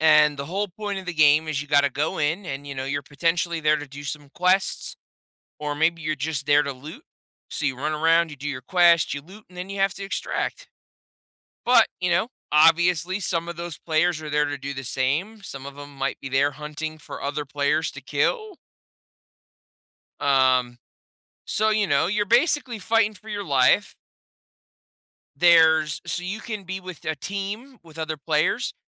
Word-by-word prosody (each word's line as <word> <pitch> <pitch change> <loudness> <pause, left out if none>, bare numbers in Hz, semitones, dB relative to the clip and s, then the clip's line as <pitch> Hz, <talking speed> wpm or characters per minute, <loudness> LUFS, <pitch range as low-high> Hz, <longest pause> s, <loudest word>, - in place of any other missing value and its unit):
And 150 -2 +5
the 140 - -3
whole 200 +5 -2
point 205 +1 -5
of 190 - -9
the 180 - -2
game 155 0 +4
is 150 -3 -1
you 145 - -7
gotta 140 -1 +4
go 145 +3 -2
in 165 +6 -1
and, 140 -1 -5
you 140 - -6
know, 130 0 -4
you're, 140 +1 -2
potentially, 165 +4 -1
there 155 0 +3
to 150 -1 -7
do 140 +1 -10
some 145 0 -6
quests, 185 +2 +1 0.6
or 150 -1 -3
maybe 165 +2 +1
you're 155 0 -1
just 145 -1 -3
there 145 0 +5
to 140 - -3
loot, 150 - -11 0.5
so 150 - -4
you 130 -2 -1
run 150 +4 -2
around, 165 +2 +3
you 150 - -9
do 145 +2 -5
your 135 -3 -4
quest, 170 +2 +4
you 145 - -6
loot, 195 +7 -15
and 180 - -17
then 185 +2 -6
you 200 - -5
have 195 0 +2
to 200 - -8
extract, - - -3 1.0
but, 250 +1 +6
you 180 -1 0
know, 175 +7 +2 0.2
obviously, 175 +4 +4
some 170 -2 -1
of 170 - -6
those 170 -2 -6
players 160 0 +1
are 155 - -6
there 150 0 +2
to 145 0 -4
do 140 +1 -5
the 135 -1 -6
same. 160 - -1
Some 135 -7 -8
of 140 0 -10
'em 145 0 -10
might 135 0 -3
be 135 - -6
there 140 +2 +2
hunting 150 +2 -6
for - - -9
other 145 +1 -2
players 145 +3 0
to - - -9
kill. 435 -6 -1 1.6
Um, 130 -3 +3 0.7
so, 215 +1 +1
you 215 -1 +2
know, - - +2
you're 205 +2 0
basically 250 - +2
fighting 215 +1 +2
for 215 +2 -14
your 205 -1 -4
life. 135 -5 +3 1.4
There's 160 -2 +5
so 175 - -3
you 195 +5 -4
can 215 -4 -6
be 190 +1 -5
with 185 -3 -10
a 155 - -1
team 200 - -5
with 165 -1 -15
other 155 -1 -3
players, 145 - 0
160 Hz, 190 wpm, -24 LUFS, 145-185 Hz, 1.6 s, but